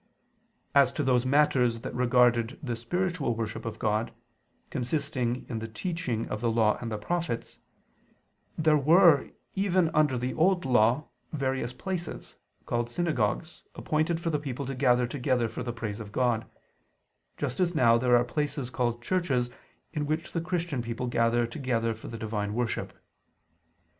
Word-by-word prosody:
As 140 Hz, -1 st, +5 dB
to 150 Hz, -, -1 dB
those 130 Hz, -1 st, +2 dB
matters 130 Hz, -5 st, +3 dB
that -, -, -6 dB
regarded 120 Hz, 0 st, +3 dB
the 120 Hz, -4 st, -2 dB
spiritual 165 Hz, +2 st, -1 dB
worship 110 Hz, -1 st, -4 dB
of 115 Hz, -1 st, -4 dB
God, 110 Hz, +1 st, 0 dB, 0.6 s
consisting 130 Hz, -2 st, -2 dB
in 115 Hz, -3 st, -3 dB
the 115 Hz, -, -5 dB
teaching 125 Hz, -, -3 dB
of 105 Hz, -, -3 dB
the 120 Hz, -, +1 dB
Law 110 Hz, -2 st, +2 dB
and 115 Hz, -2 st, -4 dB
the 110 Hz, -, -2 dB
Prophets, 165 Hz, 0 st, -3 dB, 1.0 s
there 155 Hz, -1 st, +4 dB
were, 160 Hz, 0 st, +6 dB, 0.2 s
even 185 Hz, -4 st, +2 dB
under 150 Hz, -4 st, +3 dB
the 125 Hz, +1 st, -2 dB
Old 175 Hz, +1 st, +2 dB
Law, 125 Hz, +3 st, +3 dB, 0.2 s
various 130 Hz, -4 st, -1 dB
places, 175 Hz, +6 st, -5 dB, 0.3 s
called 120 Hz, 0 st, -1 dB
synagogues, 155 Hz, -, -1 dB
appointed 155 Hz, +2 st, 0 dB
for 170 Hz, -1 st, -2 dB
the 150 Hz, -, 0 dB
people 140 Hz, -1 st, -4 dB
to 135 Hz, -, -3 dB
gather 125 Hz, -2 st, +3 dB
together 125 Hz, -1 st, 0 dB
for 120 Hz, -, -6 dB
the 120 Hz, -1 st, -3 dB
praise 115 Hz, -3 st, -5 dB
of 105 Hz, -2 st, -8 dB
God; 120 Hz, -1 st, +1 dB, 0.9 s
just 130 Hz, -3 st, -3 dB
as 180 Hz, -2 st, +1 dB
now 115 Hz, -5 st, +5 dB
there 125 Hz, 0 st, +4 dB
are 120 Hz, -, +3 dB
places 145 Hz, 0 st, -2 dB
called 120 Hz, -2 st, -1 dB
churches 130 Hz, -7 st, 0 dB, 0.4 s
in 150 Hz, -2 st, -2 dB
which 155 Hz, +2 st, -2 dB
the 165 Hz, -, -1 dB
Christian 170 Hz, -6 st, -2 dB
people 115 Hz, +1 st, -4 dB
gather 120 Hz, 0 st, +2 dB
together 115 Hz, -2 st, -1 dB
for 110 Hz, -, -11 dB
the 115 Hz, -, -6 dB
divine 105 Hz, -2 st, -3 dB
worship. 120 Hz, -1 st, -2 dB
125 Hz, 160 wpm, -28 LUFS, 115-150 Hz, 1.0 s, were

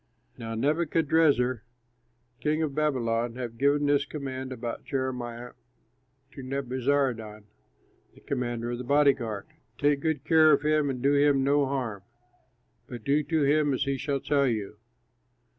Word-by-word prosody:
Now 115 Hz, -2 st, -6 dB
Nebuchadrezzar, 150 Hz, -2 st, +2 dB, 0.8 s
king 155 Hz, +1 st, 0 dB
of 150 Hz, -3 st, -2 dB
Babylon, 120 Hz, -6 st, 0 dB
had 120 Hz, -2 st, -6 dB
given 145 Hz, +1 st, +2 dB
this 145 Hz, 0 st, +3 dB
command 130 Hz, -3 st, -6 dB
about 120 Hz, -2 st, -5 dB
Jeremiah 125 Hz, -3 st, -4 dB, 0.8 s
to 140 Hz, -, -10 dB
Nebuzaradan, 130 Hz, -4 st, -1 dB, 0.7 s
the -, -, -18 dB
commander 120 Hz, -1 st, -3 dB
of 120 Hz, -, -4 dB
the -, -, -4 dB
body 140 Hz, +2 st, +4 dB
guard, 115 Hz, -6 st, -5 dB, 0.3 s
"Take 145 Hz, -1 st, +2 dB
good 155 Hz, -2 st, -1 dB
care 155 Hz, -1 st, +5 dB
of 145 Hz, 0 st, +2 dB
him, 150 Hz, -1 st, +2 dB
and 125 Hz, -2 st, -4 dB
do 140 Hz, +1 st, +3 dB
him 140 Hz, -1 st, +3 dB
no 140 Hz, 0 st, +2 dB
harm; 125 Hz, -7 st, -3 dB, 0.9 s
but 120 Hz, -3 st, -8 dB
do 145 Hz, +4 st, +2 dB
to 155 Hz, 0 st, 0 dB
him 145 Hz, 0 st, +2 dB
as 135 Hz, -, -1 dB
he 140 Hz, 0 st, -1 dB
shall 140 Hz, +1 st, -2 dB
tell 140 Hz, -2 st, +2 dB
you." 105 Hz, -3 st, -3 dB
135 Hz, 145 wpm, -27 LUFS, 120-145 Hz, 0.9 s, care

